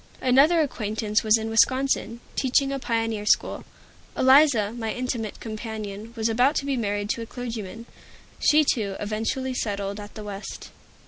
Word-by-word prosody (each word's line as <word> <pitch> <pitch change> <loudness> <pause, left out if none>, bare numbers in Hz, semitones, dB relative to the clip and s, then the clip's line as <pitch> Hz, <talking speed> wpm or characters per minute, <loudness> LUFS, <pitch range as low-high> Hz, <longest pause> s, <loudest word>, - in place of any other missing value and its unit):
Another 280 +7 +5
acquaintance 215 -6 -1
was 215 0 +5
in 220 0 -4
Wisconsin, 240 0 +2
teaching 270 +1 +2
a 275 - -2
pioneer 225 -3 -1
school. 210 - +1 0.5
Eliza, 260 -6 +5
my 225 -2 -3
intimate 240 -4 -4
companion, 215 -1 -6
was 220 -1 0
about 245 +6 +2
to 280 - -1
be 280 -1 0
married 205 -2 -1
to 230 - -3
a 230 - -6
clergyman. 230 -3 -6 0.5
She, 305 +1 +5
too, 210 -8 0
eventually 225 +5 -2
settled 200 -3 -3
at 205 0 -10
the 215 - -7
West. 205 0 -8
225 Hz, 150 wpm, -25 LUFS, 210-255 Hz, 0.5 s, Another